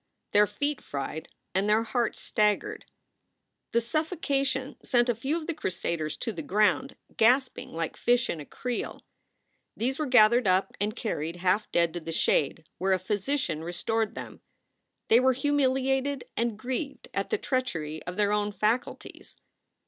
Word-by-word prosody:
Their 210 0 +5
feet 290 +3 -2
fried 145 +3 -5 0.3
and 195 +3 +1
their 215 +2 +4
hearts 235 0 -1
staggered. 215 - 0 0.9
The 235 - +3
suffocation 275 -1 -1
sent 240 -1 +2
a - - +4
few 270 +8 -1
of 325 - -5
the 335 - -2
crusaders 170 - -3
to 230 - -3
the 170 -6 -5
ground, 210 - +2 0.2
gasping 250 +4 +3
like 165 0 -3
fish 240 0 +2
in 165 - -3
a 145 - -7
creel. 250 -1 -4 0.7
These 260 +5 -1
were 305 - 0
gathered 240 -2 +6
up 185 +1 +2
and 210 +2 0
carried 170 -8 -3
half 185 +4 +1
dead 170 -1 +2
to 175 - -3
the 165 0 -6
shade, 155 0 +1
where 190 +1 +2
a - - +4
physician 200 - -1
restored 215 +6 -1
them. - - -8 0.7
They 230 - +6
were 260 +1 +4
humiliated 270 0 +1
and 230 -2 0
grieved 260 +5 -4
at - - -1
the 435 - +1
treachery 165 - -2
of 180 - -4
their 205 0 +2
own 210 0 +1
faculties. 220 +4 -2
225 Hz, 155 wpm, -28 LUFS, 185-260 Hz, 0.9 s, gathered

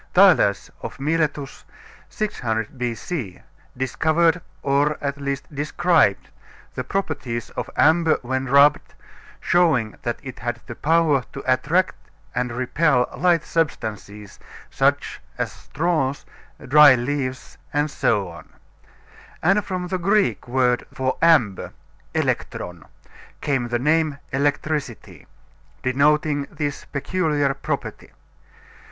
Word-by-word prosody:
Thales 180 - +5
of - - -7
Miletus, 150 -1 -1 0.5
600 115 - -3
B.C., 120 - -4 0.4
discovered, 160 +6 +2 0.2
or 145 +2 +2
at 140 0 -4
least 140 +2 -4
described, 150 - +2 0.4
the 130 - -4
properties 130 - -3
of - - -5
amber 160 0 +4
when 130 +2 -2
rubbed, 140 +2 +4 0.4
showing 155 -11 +2
that 120 - -3
it 130 -3 -8
had 120 0 -3
the 120 - -7
power 155 -1 +2
to 140 - -7
attract 150 +8 +2 0.4
and 125 -1 -1
repel 130 +1 +1
light 170 +2 +2
substances, 105 - -3 0.3
such - - 0 0.2
as - - -2
straws, 150 -4 -2 0.4
dry 145 0 +8
leaves, 130 +1 -4
etc. 105 - -1 1.0
And 195 +5 +3
from 180 -2 -4
the 185 0 -1
Greek 195 -1 +1
word 125 -1 +1
for 130 0 -1
amber 150 - +3 0.4
elektron 85 -3 -2 0.5
came 135 -4 -1
the 120 0 0
name 150 +2 +1
electricity, 135 - -2 0.6
denoting 145 +2 +2
this 145 -2 -4
peculiar 145 -2 0
property. 135 - -5
140 Hz, 105 wpm, -22 LUFS, 125-160 Hz, 1.0 s, dry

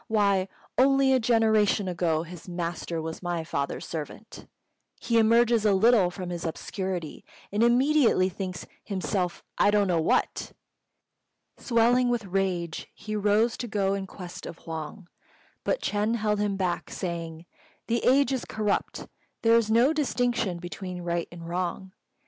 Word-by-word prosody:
Why, 200 -3 +2 0.3
only 270 0 +5
a 260 - +4
generation 220 -3 +3
ago 165 -3 0
his 175 +1 -11
master 170 -1 -3
was 160 0 -6
my 175 -2 -2
father's 140 -3 -3
servant! 160 +7 -7 0.5
He 230 -1 +2
emerges 230 0 +4
a 210 -2 +4
little 210 -2 +5
from 180 0 -6
his 170 -1 -4
obscurity, 180 0 -4 0.3
and 205 +2 0
immediately 245 -4 +4
thinks 185 -1 -5 0.2
himself 190 -2 -2 0.2
I - - +5
don't 205 -1 +3
know 170 -3 +2
what!" 160 - 0 1.1
Swelling 245 +1 +3
with 240 -3 -1
rage, 180 -3 -2
he 215 0 -5
rose 210 +3 +2
to 240 - -4
go 200 -3 0
in 195 -1 -3
quest 180 -2 -9
of 165 - -8
Huang, 165 +4 -6 0.6
but - - -1
Ch'êng 210 +3 0
held 210 -2 0
him 205 -1 0
back, 180 -3 -2
saying, 170 -2 -5 0.4
"The 235 0 -1
age 275 +1 +4
is 260 - -2
corrupt: 210 -2 -2 0.4
there 225 0 +5
is 230 -2 +3
no 240 +7 +4
distinction 245 - 0
between 180 +1 -7
right 170 0 -1
and 170 -1 -9
wrong. 180 +2 -3
195 Hz, 150 wpm, -27 LUFS, 175-230 Hz, 1.1 s, only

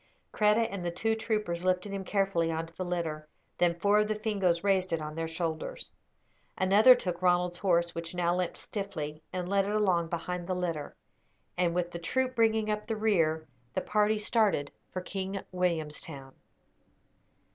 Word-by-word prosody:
Kreta 215 +2 +3
and 195 -3 -4
the 175 - 0
two 220 +6 0
troopers 210 -6 -1
lifted 185 +2 +1
him 195 -1 -3
carefully 195 -4 +1
on 160 0 -2
to 165 - -16
the 185 - -3
litter; 165 -4 -3 0.3
then 170 -1 +3
four 205 +3 +4
of 210 - +2
the 215 - 0
Fingoes 195 -6 0
raised 190 -2 +2
it 165 - +2
to 155 -1 -5
their 165 +1 -3
shoulders. 165 -1 -4 0.7
Another 205 +7 +7
took 180 -7 -4
Ronald's 180 -1 +2
horse, 170 -3 +2
which 165 +1 -5
now 175 0 +1
limped 180 -1 -2
stiffly, 160 -7 -5
and 180 -1 -3
led 195 +1 +2
it 205 +1 -1
along 185 -5 +2
behind 175 +1 -3
the 185 - -1
litter; 170 -5 -3 0.6
and 175 -1 +1
with 175 -1 0
the 170 - -5
troop 255 +9 -1
bringing 220 -1 +3
up 210 0 -2
the 225 - -2
rear, 165 -7 +1 0.3
the - - +1
party 210 0 +2
started 210 -9 +1 0.2
for 185 - -3
King 195 +1 -3
Williamstown. 155 -6 -3
180 Hz, 175 wpm, -30 LUFS, 170-210 Hz, 0.7 s, Another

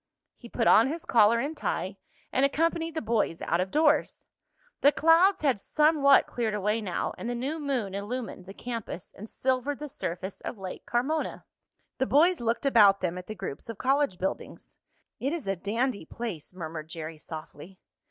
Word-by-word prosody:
He 235 - -13
put 230 - -1
on 225 +2 +6
his 320 +4 -4
collar 225 0 +5
and 285 +7 -2
tie - - -3 0.4
and 265 - +2
accompanied 325 +3 +1
the 315 - -2
boys 220 -7 0
out 170 - 0
of 185 - -2
doors. 300 +4 +2 0.6
The 285 - +6
clouds 330 +5 +4
had 265 -8 +2
somewhat 300 +3 +4
cleared 225 -3 -2
away 210 +2 0
now 185 -5 -2
and 240 - -4
the 245 - -2
new 275 +7 -3
moon 260 -9 -2
illumined 205 -2 -5
the 195 - -8
campus 230 -7 -6
and 215 +3 -9
silvered 260 +2 -1
the 300 - -6
surface 190 - -5
of - - -6
Lake 190 -2 -8
Carmona. 270 +7 -1 0.6
The 265 - +1
boys 335 +5 +4
looked 235 +3 -1
about 210 -7 +6
them 180 -1 -1
at 180 - -11
the 215 - -6
groups 190 -1 -6
of 230 - -6
college 270 -7 +1
buildings. 190 +2 -5 0.4
"It 275 +4 -1
is 335 -4 -4
a 195 0 0
dandy 215 +2 -2
place!" 205 -10 -6
murmured 160 -3 -7
Jerry 160 -1 -7
softly. 160 +3 -9
235 Hz, 180 wpm, -28 LUFS, 195-280 Hz, 0.6 s, on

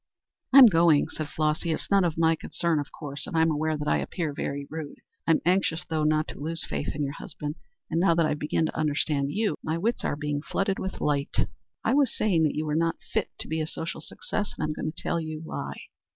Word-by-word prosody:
"I'm 270 0 +11
going," 165 -7 +5
said 155 -2 -5
Flossy. 155 +2 0
"It's 160 - -3
none 200 -1 +5
of 165 -3 0
my 165 0 +4
concern 165 0 -1
of 145 - -5
course, 140 -2 -6
and 165 - -2
I'm 160 0 +4
aware 155 +1 0
that 150 0 -4
I - - +3
appear 160 -5 -3
very 140 0 -3
rude. 155 -2 -6 0.3
I'm 165 -1 +4
anxious 180 -2 +2
though 155 -1 -1
not 155 0 +2
to - - -8
lose 165 +3 -3
faith - - -3
in 150 - -1
your 140 0 -2
husband, 150 0 -6 0.3
and 165 - 0
now 170 -2 +4
that 165 -1 +3
I've 150 -1 0
begun 155 +2 +1
to - - -4
understand 150 -2 +1
you, 210 -4 0
my 160 +1 -1
wits 225 +8 0
are - - 0
being 145 -1 -2
flooded 195 +4 -1
with 190 - -4
light. 145 -1 +1 0.4
I - - +2
was 280 -3 +3
saying 190 -7 +3
that 150 - 0
you 155 - -1
were 150 - -1
not 165 +1 +2 0.2
fit - - +1
to - - -6
be 160 0 -1
a 155 - -2
social 165 +1 -5
success, 205 -2 -4
and - - -2
I'm 155 0 0
going 155 - -3
to 160 - -11
tell 170 - 0
you 155 -1 -5
why. - - -5
160 Hz, 240 wpm, -27 LUFS, 150-170 Hz, 0.4 s, I'm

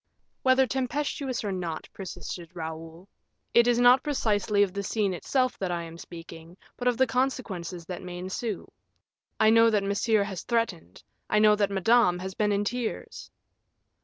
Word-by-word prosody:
"Whether 260 0 +4
tempestuous 265 0 -2
or 205 - -2
not," 175 -4 -4
persisted 180 -2 -7
Raoul, 165 +2 -7 0.5
"it 235 0 +5
is 240 -1 +3
not 245 +2 +6
precisely 210 -7 +1
of 190 -3 -2
the 200 - -2
scene 200 -1 0
itself 255 +8 0
that 190 - -2
I 170 -1 -2
am 165 0 -10
speaking, 165 0 -11 0.2
but 250 - -3
of 245 -2 +2
the 260 - +4
consequences 230 -9 -2
that 180 0 -6
may 180 -1 -7
ensue. 190 +3 -4 0.7
I 220 - +5
know 230 0 +6
that 210 -3 +1
Monsieur 205 +2 +2
has 195 -3 -5
threatened, 215 - -2 0.3
I 215 - +2
know 210 0 +6
that 205 -1 +1
Madame 200 -1 +3
has 190 +1 -6
been 210 +1 +1
in 200 0 +1
tears." 240 +2 -4
205 Hz, 165 wpm, -27 LUFS, 180-235 Hz, 0.7 s, not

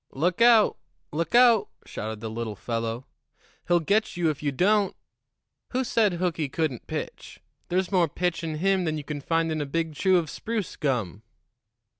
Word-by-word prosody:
"Look 175 +9 0
out! 235 -2 +6 0.3
look 165 +9 -2
out!" 240 -3 +6 0.2
shouted 110 0 -6
the 110 - -4
little 110 -1 -4
fellow. 115 +3 -3 0.6
"He'll 175 0 +4
get 200 +4 0
you 165 -3 +2
if 145 - -8
you 145 -1 0
don't. 200 +7 +2 0.8
Who 260 +1 +1
said 220 -5 +2
Hooky 170 -4 -1
couldn't 150 -5 -2
pitch? - - -6 0.3
There's 185 +1 0
more 180 -3 +3
pitch 175 +3 -2
in 160 -1 -3
him 190 +3 +1
than 155 -1 -1
you 150 - -5
can 145 0 -5
find 165 +2 0
in 155 -1 -1
a - - -2
big 165 +2 -2
chew 185 +4 +3
of 170 -2 0
spruce 220 -4 -4
gum." 115 - -2
165 Hz, 175 wpm, -26 LUFS, 140-190 Hz, 0.8 s, out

